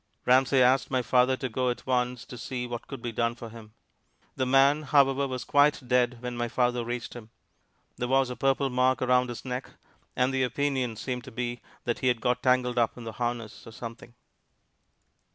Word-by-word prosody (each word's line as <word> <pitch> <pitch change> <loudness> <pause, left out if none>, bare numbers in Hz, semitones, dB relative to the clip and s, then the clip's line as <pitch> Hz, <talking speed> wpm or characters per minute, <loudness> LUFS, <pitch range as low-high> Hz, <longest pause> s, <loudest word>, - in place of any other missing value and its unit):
Ramsey 130 +1 +4
asked 130 +2 +3
my 130 -2 0
father 125 +2 +3
to 130 - -3
go 125 +1 -1
at 120 - -4
once 125 -1 -1
to - - -10
see 125 0 -4
what 120 -1 -6
could 135 -4 -8
be 120 - -3
done 115 +1 0
for 120 -1 -9
him. 110 -1 -13 0.6
The 130 - -1
man, 135 +3 +4
however, 140 -1 +3
was 130 -3 -4
quite 145 -2 +3
dead 125 0 +2
when 125 0 -4
my 120 0 -1
father 125 0 0
reached 120 -1 -5
him. 115 -2 -10 0.7
There 125 - -2
was 135 0 +2
a - - -5
purple 135 0 +1
mark 125 0 +2
around 125 0 +3
his 120 - -7
neck: 125 0 -4 0.5
and 125 +1 +1
the 135 - +1
opinion 130 -2 -1
seemed 125 +2 -4
to 130 - -10
be 120 0 -4 0.2
that 120 - -2
he 130 - 0
had 120 -2 +2
got 125 +2 0
tangled 125 -1 +2
up 115 +1 +1
in 120 - -8
the 115 - -5
harness 120 -3 -4
or - - -9
something. 115 +1 -9
125 Hz, 205 wpm, -27 LUFS, 120-130 Hz, 0.7 s, Ramsey